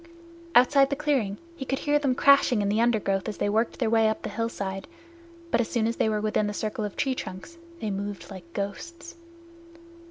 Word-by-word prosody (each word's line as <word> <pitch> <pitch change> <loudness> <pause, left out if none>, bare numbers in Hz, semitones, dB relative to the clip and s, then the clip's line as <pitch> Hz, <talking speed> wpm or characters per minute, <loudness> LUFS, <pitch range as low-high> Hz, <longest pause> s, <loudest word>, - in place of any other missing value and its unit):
Outside 275 +2 +6
the 280 - 0
clearing 270 -9 0 0.2
he 285 - -5
could 270 0 -2
hear 295 +1 +1
them 275 -3 +1
crashing 275 -6 +5
in 200 - 0
the 215 +2 +2
undergrowth 215 -4 +1
as 210 - -6
they - - 0
worked 220 +3 0
their 240 - 0
way 225 -1 +4
up 220 - -3
the - - -4
hillside, 200 -4 -3 0.6
but - - +3
as 225 - -3
soon 230 -2 0
as 230 +1 -1
they 220 - +2
were 215 -1 0
within 215 0 +1
the 205 - -4
circle 215 +2 -3
of 205 -2 -3
the - - -23
tree 270 -2 +1
trunks 255 - -8 0.2
they 215 - -2
moved 200 +1 -5
like 180 -3 -10
ghosts. 335 - -6
225 Hz, 215 wpm, -26 LUFS, 205-270 Hz, 0.6 s, Outside